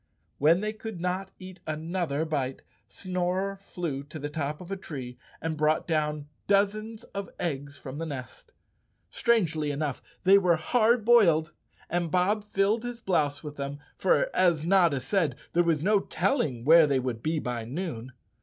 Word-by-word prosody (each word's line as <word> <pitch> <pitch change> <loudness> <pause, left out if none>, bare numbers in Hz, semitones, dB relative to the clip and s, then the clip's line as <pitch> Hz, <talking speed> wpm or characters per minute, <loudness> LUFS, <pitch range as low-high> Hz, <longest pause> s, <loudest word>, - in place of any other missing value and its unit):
When 165 +6 +4
they 215 0 -2
could 220 -3 -7
not 180 +2 -2
eat 185 0 -11
another 160 -1 -2
bite, 135 -4 -2 0.2
Snorer 185 +1 -2
flew 175 -8 -4
to 155 +2 -9
the 145 0 -5
top 150 -1 -3
of 180 +1 -10
a - - 0
tree 130 -9 -8 0.2
and 160 -1 -2
brought 155 +1 +1
down 150 -2 -1 0.2
dozens 215 +2 +1
of 200 -2 -4
eggs 145 -4 -3
from 135 +2 -8
the 165 - -3
nest. 130 -5 -8 0.6
Strangely 165 -10 +1
enough, 145 -2 -2 0.2
they 195 +2 +7
were 180 -3 +3
hard 225 +7 +2
boiled 170 -9 +5 0.4
and 175 0 -1
Bob 185 +5 +2
filled 205 +2 +1
his 245 0 -5
blouse 155 -9 0
with 150 -1 -7
them, 140 0 -4 0.2
for - - +2
as 170 -4 +3
Notta 170 -6 +4
said, 160 +5 0 0.2
there 175 - +4
was 165 -3 +1
no 205 +2 +4
telling 150 - -1
where 160 +1 +7
they 140 -2 +2
would 125 -3 -3
be 155 +5 0
by 125 -5 -3
noon. 130 -2 -5
165 Hz, 165 wpm, -28 LUFS, 145-195 Hz, 0.6 s, they